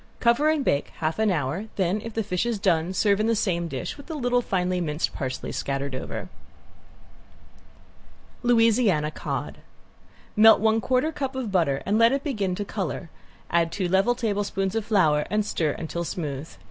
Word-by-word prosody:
Cover 235 +6 +3
and 310 -3 +1
bake 140 - +1
half 160 +5 -2
hour, 180 -3 0
then 190 +2 0
if 225 -1 -7
the 225 - 0
fish 180 -2 -1
is 235 -2 -1
done 175 -3 +1
serve 200 +1 +2
in 215 - +1
the 230 - +2
same 175 -5 0
dish 135 - -5
with 285 - -13
little 245 -6 +1
finely 180 -4 -1
minced 150 -1 -1
parsley 130 -3 -4
scattered 140 0 -3
over. 130 - -5 2.1
~LOUISIANA 225 -9 +3
COD~ - - -5 0.8
Melt 220 +1 +7
one 220 +1 +2
quarter 255 +7 +1
cup 270 -3 -4
of 250 -6 -3
butter 160 -8 +1
and 205 +3 +1
let 230 +1 +6
it 275 - -1
begin 205 - -1
to 205 - -4
color, 185 -5 -4 0.4
add 170 -1 +2
two 185 +1 -1
level 195 +7 +3
tablespoons 205 -4 -1
of 225 -2 -1
flour 160 -9 +2
and 210 0 +1
stir 155 -7 0
until 170 +1 -4
smooth. 150 -3 -4
195 Hz, 170 wpm, -25 LUFS, 165-230 Hz, 2.1 s, Melt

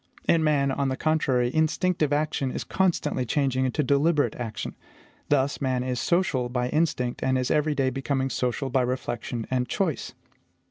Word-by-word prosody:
In 165 -1 +4
man, 140 -3 +2
on 135 0 0
the 130 - -2
contrary, 130 -6 +1
instinctive 160 0 +1
action 145 -2 0
is - - -4
constantly 180 -8 0
changing 130 +1 0
into 130 +4 0
deliberate 145 +3 +2
action. 115 -3 -5 0.5
Thus, 140 0 +1
man 130 -2 0
is 125 -1 -2
social 145 -8 +1
by 125 0 -1
instinct, 140 -6 0
and 130 0 +2
is 125 -1 -1
every 150 0 +2
day 135 -2 +1
becoming 135 0 -1
social 125 +2 -1
by 130 0 +3
reflection 120 -2 -3
and 125 -1 0
choice. 180 -8 -1
135 Hz, 165 wpm, -26 LUFS, 125-150 Hz, 0.5 s, In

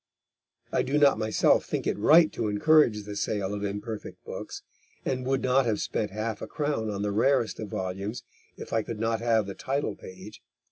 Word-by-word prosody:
(I - - +2
do 140 +3 0
not 145 -2 +5
myself 110 0 +3
think - - -3
it - - 0
right 155 +10 +6
to 115 - -2
encourage 105 0 +4
the 105 0 -7
sale 100 -1 -1
of 105 0 -4
imperfect 105 +2 -5
books, - - -7 0.4
and 130 -1 -2
would 135 0 0
not 130 0 +3
have 110 -2 0
spent 105 - -2
half 110 +1 -4
a - - -5
crown 145 -8 -2
on 100 -1 -3
the 105 - 0
rarest 115 +3 +2
of 110 - -4
volumes 100 +6 -4 0.3
if - - -8
I 115 - +2
could 110 0 -6
not 115 0 0
have 115 -2 +2
the 100 - -6
title 135 -2 -2
page. 95 +3 -11
110 Hz, 195 wpm, -27 LUFS, 105-130 Hz, 0.4 s, right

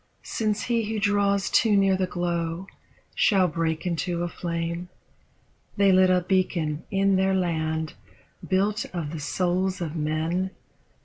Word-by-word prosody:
Since 215 -2 -1
he 230 -2 0
who 220 - -1
draws 200 -1 +2
too 215 -3 +4
near 195 -1 +4
the 185 0 0
glow 175 0 -2 0.5
shall 190 -3 +3
break 165 0 -2
into 170 0 -1
a - - -1
flame? 170 +1 -4 0.9
They 200 -1 +5
lit 185 0 +5
a 180 0 +3
beacon 175 -4 0
in 195 -1 +2
their 190 0 +2
land, 160 -3 -1 0.6
built 200 +2 +1
of 160 -4 -3
the 165 - -5
souls 185 +4 0
of 165 -2 -4
men. 160 +4 -1
180 Hz, 140 wpm, -25 LUFS, 165-195 Hz, 0.9 s, They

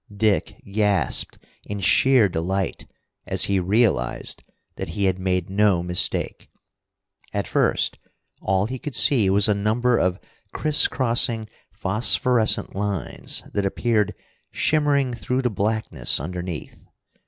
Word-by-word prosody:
Dick 105 -1 0
gasped 100 -1 +1 0.3
in 105 0 -4
sheer 125 +3 +4
delight 95 +3 -3 0.4
as - - +4
he 100 -1 +2
realized 95 - 0 0.3
that - - -5
he 100 - +1
had 95 -1 0
made 90 -2 -1
no 100 -2 +2
mistake. 90 0 -1 0.8
At 100 -1 -2
first - - 0 0.4
all 95 +1 +1
he 130 +3 -5
could 145 0 -6
see 115 -9 +4
was 100 +2 +4
a 105 - +3
number 115 +4 +1
of 90 0 0 0.3
criss 155 -1 +3
crossing 115 -3 +1 0.2
phosphorescent 110 +3 +1
lines 100 -3 -3
that 100 - 0
appeared 105 +1 0 0.3
shimmering 145 -4 +1
through 125 +3 -2
the 125 - 0
blackness 110 +2 0
underneath. 90 +2 -6
105 Hz, 120 wpm, -23 LUFS, 95-120 Hz, 0.8 s, sheer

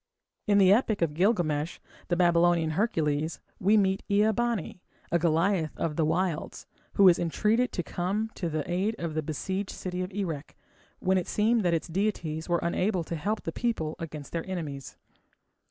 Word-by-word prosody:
In 205 -1 +4
the 195 -1 +7
epic 215 -4 +2
of 155 -3 0
Gilgamesh, 170 -4 +1 0.3
the 175 - +1
Babylonian 170 -2 +3
Hercules, 155 -5 0 0.2
we 205 +4 +4
meet 195 -1 +2
with 200 - +2
Ea 215 +1 +4
bani, 230 -6 -2 0.3
a 170 - +3
Goliath 165 +1 +1
of 160 -2 -2
the 160 - +1
wilds, 165 +1 -1 0.3
who 200 - +6
is 175 - +6
entreated 215 +8 +1
to 175 - -2
come 200 +7 -2
to 175 - -3
the 155 -2 -3
aid 190 +5 0
of 165 -2 -4
the 155 - 0
besieged 190 +6 -3
city 180 0 -4
of 185 +2 -4
Erech 170 -7 -4 0.4
when 190 0 +2
it 175 - -5
seemed 225 +2 +2
that 175 -3 +2
its 165 - -3
deities 170 -3 -2
were 175 - +3
unable 180 +1 0
to 170 - -5
help 205 +7 -2
the 165 - -3
people 165 -8 -2
against 150 -3 -7
their 170 +2 -4
enemies. 145 -7 -5
175 Hz, 180 wpm, -28 LUFS, 160-200 Hz, 0.4 s, the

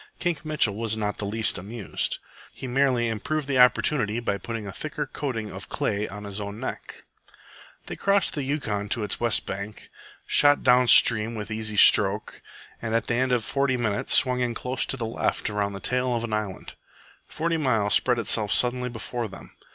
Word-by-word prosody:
Kink 170 -4 -2
Mitchell 150 -10 +1
was 110 0 -2
not 105 -1 -1
in - - -27
the - - -4
least 110 -3 -1
amused. 105 +2 -4 0.3
He - - -9
merely 130 -2 +1
improved 135 +7 -3
the 135 -2 +1
opportunity 125 -3 +3
by 100 -4 -2
putting 115 +2 -6
a 100 - -6
thicker 150 +7 -5
coating 125 -6 -5
of - - -9
clay 105 +1 -1
on 105 +1 -9
his 100 0 -6
own 100 +1 -6
neck. 130 - -7 0.8
They - - -6
crossed 200 0 +1
the 150 - -3
Yukon 120 -8 -3
to 115 - -1
its 105 - -3
west 115 -1 +2
bank, 100 +2 -7 0.3
shot 145 0 +4
down 125 0 +5
stream 115 -1 +6
with 105 0 -6
easy 110 -1 -4
stroke, 105 +1 +4 0.4
and 115 0 -2
at 115 - +1
the - - -1
end 130 +2 +1
of 120 -3 +1
forty 135 -2 0
minutes 110 -4 0
swung 125 -1 +4
in 120 -2 -1
close 125 +2 -3
to 135 - -3
the 115 - -3
left 110 -1 -2
around 100 -1 -2
the 100 - -6
tail 125 +4 -1
of 115 - -2
an 115 -2 -4
island. 105 -3 -4 0.5
Forty 165 +1 -2
Mile 115 -9 +1
spread 125 +3 +3
itself 110 -2 0
suddenly 125 +1 +3
before 120 0 -5
them. 95 - -12
115 Hz, 195 wpm, -25 LUFS, 105-130 Hz, 0.8 s, stream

